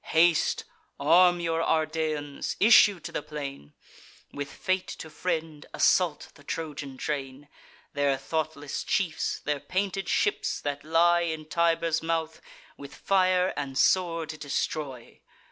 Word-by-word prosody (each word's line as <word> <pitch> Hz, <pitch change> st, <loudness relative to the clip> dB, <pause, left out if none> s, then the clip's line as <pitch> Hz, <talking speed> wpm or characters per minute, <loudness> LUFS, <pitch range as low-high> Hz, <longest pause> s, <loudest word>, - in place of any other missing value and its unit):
Haste; 165 Hz, 0 st, +3 dB, 0.4 s
arm 175 Hz, +4 st, +5 dB
your 165 Hz, -1 st, -1 dB
Ardeans; 155 Hz, -3 st, -1 dB
issue 205 Hz, -3 st, +6 dB
to -, -, -7 dB
the -, -, -3 dB
plain; 140 Hz, -, -8 dB, 0.6 s
With 145 Hz, 0 st, -5 dB
fate 185 Hz, -1 st, -1 dB
to 160 Hz, -, -8 dB
friend, 160 Hz, -4 st, -3 dB
assault 175 Hz, -5 st, +2 dB
the 145 Hz, -, -18 dB
Trojan 145 Hz, -3 st, -5 dB
train: 140 Hz, 0 st, -4 dB, 0.5 s
Their 140 Hz, -1 st, +1 dB
thoughtless 150 Hz, 0 st, -3 dB
chiefs, 175 Hz, -5 st, -1 dB
their 145 Hz, -1 st, -2 dB
painted 195 Hz, +2 st, -2 dB
ships, 420 Hz, +1 st, 0 dB
that 145 Hz, -1 st, -4 dB
lie 170 Hz, +2 st, +3 dB
In 160 Hz, -2 st, -3 dB
Tiber's 165 Hz, 0 st, +1 dB
mouth, 160 Hz, -1 st, -2 dB, 0.4 s
with 140 Hz, 0 st, -10 dB
fire 185 Hz, -1 st, +2 dB
and 140 Hz, -2 st, -4 dB
sword 165 Hz, -3 st, +2 dB
destroy. 140 Hz, -3 st, -4 dB
160 Hz, 125 wpm, -27 LUFS, 145-175 Hz, 0.6 s, issue